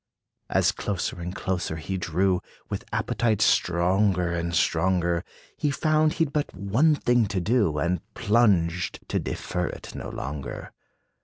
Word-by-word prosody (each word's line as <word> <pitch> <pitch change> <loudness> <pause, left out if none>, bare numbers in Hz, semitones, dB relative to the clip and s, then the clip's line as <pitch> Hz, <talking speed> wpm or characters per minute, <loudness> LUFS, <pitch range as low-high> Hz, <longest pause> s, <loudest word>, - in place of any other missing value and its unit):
As - - +3
closer 95 -3 -3
and 90 +2 -5
closer 90 -4 -2
he 80 +4 -4
drew, 90 +1 +1 0.3
With - - -3
appetite 110 -1 0
stronger 90 -2 +2
and 85 0 -2
stronger, 85 +1 +2 0.3
He 150 - 0
found 155 +2 +2
he 165 - +2
'd 145 - -9
but 150 -1 -1
one 115 - +3
thing 120 -5 +2
to 100 -1 -1
do, 100 -5 +2
And 85 +3 0
plunged, 95 -6 +2
to - - +1
defer 90 -1 -3
it - - -8
no - - -6
longer. 70 +1 -6
95 Hz, 145 wpm, -26 LUFS, 85-110 Hz, 0.3 s, As